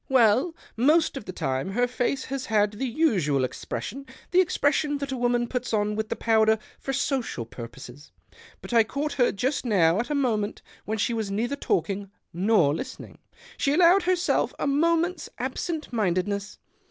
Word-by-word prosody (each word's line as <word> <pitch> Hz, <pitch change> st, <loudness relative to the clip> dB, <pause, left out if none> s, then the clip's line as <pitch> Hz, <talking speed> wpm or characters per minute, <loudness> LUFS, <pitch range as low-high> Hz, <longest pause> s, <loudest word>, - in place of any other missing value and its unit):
" -, -, -41 dB
Well, 260 Hz, +6 st, +4 dB, 0.2 s
most 300 Hz, +8 st, +3 dB
of 270 Hz, -, -6 dB
the -, -, -5 dB
time 135 Hz, +2 st, -2 dB
her 245 Hz, +3 st, +2 dB
face 255 Hz, +2 st, -1 dB
has 270 Hz, -1 st, -4 dB
had 210 Hz, -2 st, +2 dB
the 225 Hz, +6 st, -3 dB
usual 190 Hz, -, +1 dB
expression 265 Hz, -, -5 dB
— -, -, -25 dB
the 365 Hz, +1 st, +6 dB
expression 290 Hz, -3 st, +1 dB
that 280 Hz, -1 st, -4 dB
a -, -, -1 dB
woman 240 Hz, -1 st, +1 dB
puts 250 Hz, -1 st, -3 dB
on 210 Hz, 0 st, 0 dB
with 220 Hz, 0 st, -3 dB
the -, -, -1 dB
powder 220 Hz, -1 st, +3 dB, 0.2 s
for 270 Hz, -, -4 dB
social 260 Hz, -, -1 dB
purposes. 120 Hz, +4 st, -10 dB, 0.5 s
But -, -, -7 dB
I 230 Hz, -1 st, +6 dB
caught 280 Hz, +6 st, -3 dB
her 245 Hz, -3 st, +3 dB
just 255 Hz, +8 st, -1 dB
now 185 Hz, -6 st, +3 dB
at 240 Hz, -, -2 dB
a 295 Hz, -, 0 dB
moment 220 Hz, -7 st, -1 dB, 0.2 s
when 220 Hz, +1 st, -2 dB
she 225 Hz, +3 st, 0 dB
was 220 Hz, -3 st, -2 dB
neither 230 Hz, +7 st, -1 dB
talking 195 Hz, -, -1 dB, 0.2 s
nor 180 Hz, -5 st, +3 dB
listening; 260 Hz, -, -7 dB, 0.4 s
she 280 Hz, -, +1 dB
allowed 355 Hz, +4 st, +6 dB
herself 360 Hz, -1 st, +1 dB
a -, -, -2 dB
moment's 335 Hz, +3 st, +1 dB
absent 290 Hz, +4 st, -4 dB
mindedness. 200 Hz, 0 st, -1 dB
240 Hz, 175 wpm, -26 LUFS, 205-280 Hz, 0.5 s, the